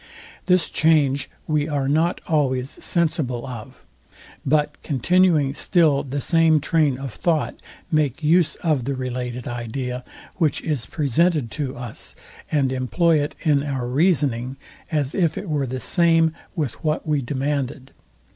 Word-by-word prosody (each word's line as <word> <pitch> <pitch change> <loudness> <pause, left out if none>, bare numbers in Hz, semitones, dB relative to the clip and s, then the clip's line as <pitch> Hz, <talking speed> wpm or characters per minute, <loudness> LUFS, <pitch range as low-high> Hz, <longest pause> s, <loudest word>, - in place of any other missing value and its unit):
This 180 -1 +3
change 145 -4 +3 0.2
we 150 -1 0
are 140 -3 0
not 160 +5 +1
always 135 -4 0
sensible 150 -8 0
of; 120 -5 -9 0.6
but 150 +1 +1
continuing 155 0 +2
still 155 -4 +3
the 140 +1 -4
same 165 0 +4
train 150 -3 +1
of 135 -3 -6
thought, 160 -4 -1 0.3
make 155 -2 +1
use 160 -1 +3
of 150 -8 +1
the 140 0 -1
related 125 -1 -4
idea, 125 +1 -4 0.3
which 160 -6 +1
is 145 -8 -2
presented 150 -3 +1
to 135 -4 -4
us, 120 -2 -7 0.4
and 140 -4 +2
employ 155 +5 +2
it 145 - -3
in 150 -4 +3
our 135 -4 -3
reasoning, 135 -4 +1 0.3
as 145 -3 0
if 170 -5 +1
it 200 - -5
were 145 -4 0
the 130 +1 -4
same 165 0 +3 0.2
with 150 - -3
what 155 -1 0
we 150 -2 +1
demanded. 135 0 -3
145 Hz, 140 wpm, -22 LUFS, 130-160 Hz, 0.6 s, same